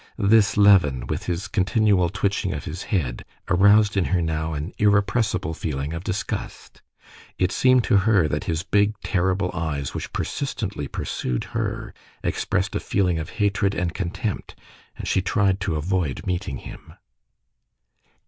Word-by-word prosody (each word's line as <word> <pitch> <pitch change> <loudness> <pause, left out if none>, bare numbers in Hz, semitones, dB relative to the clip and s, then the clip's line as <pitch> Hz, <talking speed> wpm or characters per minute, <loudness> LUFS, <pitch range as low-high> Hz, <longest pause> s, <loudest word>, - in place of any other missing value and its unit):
This 105 0 +4
Levin, 90 -12 +5
with - - -4
his 90 +1 -2
continual 95 -1 +2
twitching 95 0 -1
of 70 - -6
his 85 +5 -5
head, 70 - -1 0.2
aroused 100 +2 +5
in 95 -3 +2
her 90 - +1
now 80 -1 -2
an 75 +6 -5
irrepressible 100 -3 +2
feeling 75 -1 -3
of 85 +1 -5
disgust. 95 0 -5 0.6
It 90 0 +1
seemed 130 -1 +4
to 110 - +3
her 100 -4 +3
that 75 +6 -2
his 85 -3 -1
big, 105 0 +1
terrible 95 0 0
eyes, 80 -5 -3
which - - -5
persistently 105 - -3
pursued 60 -2 -3
her, - - -3 0.3
expressed - - -1
a - - +1
feeling 90 -4 0
of 80 - -5
hatred 100 -1 +1
and 90 -2 -1
contempt, 100 +3 -4 0.4
and - - -6
she 95 - +2
tried 95 0 +1
to 95 -4 -1
avoid 80 -2 -1
meeting 90 -6 -2
him. - - -11
95 Hz, 150 wpm, -23 LUFS, 80-100 Hz, 0.6 s, Levin